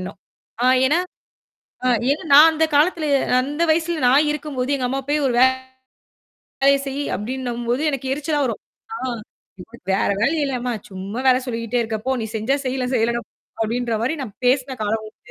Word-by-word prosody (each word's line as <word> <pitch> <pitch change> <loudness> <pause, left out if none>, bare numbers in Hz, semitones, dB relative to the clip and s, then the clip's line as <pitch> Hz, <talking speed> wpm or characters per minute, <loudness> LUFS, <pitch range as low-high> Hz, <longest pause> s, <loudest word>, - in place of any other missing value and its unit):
எண்ணம். 190 +1 -7 0.5
ஆ - - +4 0.2
ஏன்னா 310 +6 +2 0.9
அ - - +3 0.2
ஏன்னா 290 - -1
நான் 300 +3 +9
அந்த 320 0 +1
காலத்துல 310 +1 +2 0.3
அந்த 295 +5 -2
வயசுல 325 -1 0
நான் 290 +4 +4
இருக்கும்போது, 280 -3 -4
எங்க 255 - -1
அம்மா 270 +2 -2
போய் 295 +1 +2
ஒரு 245 - 0 1.1
வேலைய 275 +1 +2
செய்யி 275 +1 -3
அப்டின்னும்போது 240 +3 -3
எனக்கு 270 -1 -4
எரிச்சலா 295 +1 -2
வரும். 230 - -4 0.3
ஆ - - -4 0.7
உனக்கு 230 -3 -17
வேற - - +1
வேல 235 - +3
இல்லயாம்மா? 250 -3 -2 0.2
சும்மா 195 +5 -6
வேல 255 -1 +5
சொல்லிக்கிட்டே 230 0 -2
இருக்க? 220 -1 -3
போ! 265 - +2
நீ 220 - -3
செஞ்சா 235 +6 0
செய்யி, 255 0 -1
செய்யலனா 235 0 +1
போ, - - -85 0.3
அப்படின்ற 235 +1 -1
மாரி 260 +7 0
நான் 210 -6 -8
பேசின 260 0 +1
காலம் 220 +1 -1
உண்டு. 215 - -14
255 Hz, 170 wpm, -21 LUFS, 235-285 Hz, 1.1 s, நான்